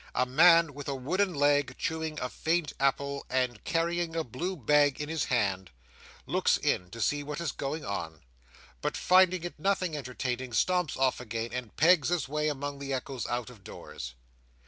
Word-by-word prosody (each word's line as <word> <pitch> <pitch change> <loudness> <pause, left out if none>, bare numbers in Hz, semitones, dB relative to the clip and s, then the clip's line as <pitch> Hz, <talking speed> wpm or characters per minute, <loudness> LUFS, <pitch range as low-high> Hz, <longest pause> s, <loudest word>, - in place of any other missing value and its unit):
A 125 - +3
man 165 +3 +6
with 145 0 -8
a 140 - -1
wooden 180 +8 0
leg, 145 -2 +2
chewing 160 -1 -3
a 125 - -2
faint 160 +3 -1
apple 140 +1 0
and 125 -3 -1
carrying 170 0 0
a 165 - 0
blue 170 - -4
bag 145 +1 +3
in 150 0 -4
has 160 -2 -1
hand, 100 -6 0 0.6
looks - - +2
in 90 -1 -1
to 115 - -10
see 145 +7 +1
what 150 +1 -5
is 170 -4 -2
going 145 +3 -4
on; 80 -6 -5 0.6
but - - -2
finding 185 -1 +4
it 175 -3 -6
nothing 185 -2 0
entertaining, 125 -2 -4
stumps 180 +3 +1
off 130 -1 +2
again, 115 -1 -4
and 125 -3 -5
pegs 160 -2 +5
his 175 -7 0
way 150 +2 -1
among 145 -1 -3
the 140 -1 -5
echoes 130 -1 -3
out 120 0 -3
of 110 -6 -16
doors. - - -8
145 Hz, 180 wpm, -29 LUFS, 125-165 Hz, 0.6 s, man